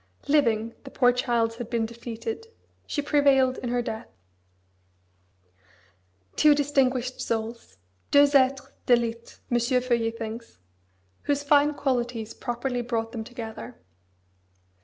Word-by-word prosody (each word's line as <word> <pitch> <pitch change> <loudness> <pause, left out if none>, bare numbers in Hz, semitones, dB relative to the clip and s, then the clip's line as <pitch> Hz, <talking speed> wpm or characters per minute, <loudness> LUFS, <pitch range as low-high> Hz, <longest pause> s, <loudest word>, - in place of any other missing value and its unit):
Living, 230 -6 +2
the 270 - -9
poor 245 -2 +4
child 240 -2 0
had 240 -2 -6
been 230 -2 0
defeated: 235 - -6 0.4
she 290 - -2
prevailed 275 -3 +3
in 245 - -4
her 245 0 0
death. 220 +1 -5 2.3
Two 300 -1 +6
distinguished 260 -3 +1
souls! 225 - -4 0.3
deux 285 0 +7
êtres 270 0 +3 0.2
d'élite 235 -1 +1
M. 240 - +3
Feuillet 240 -1 +1
thinks 230 +1 -7 0.7
whose 285 0 0
fine 290 0 +4
qualities 240 -5 -2
properly 245 0 -3
brought 230 -2 -2
them 230 -2 -5
together. 235 0 -8
245 Hz, 115 wpm, -26 LUFS, 230-270 Hz, 2.3 s, deux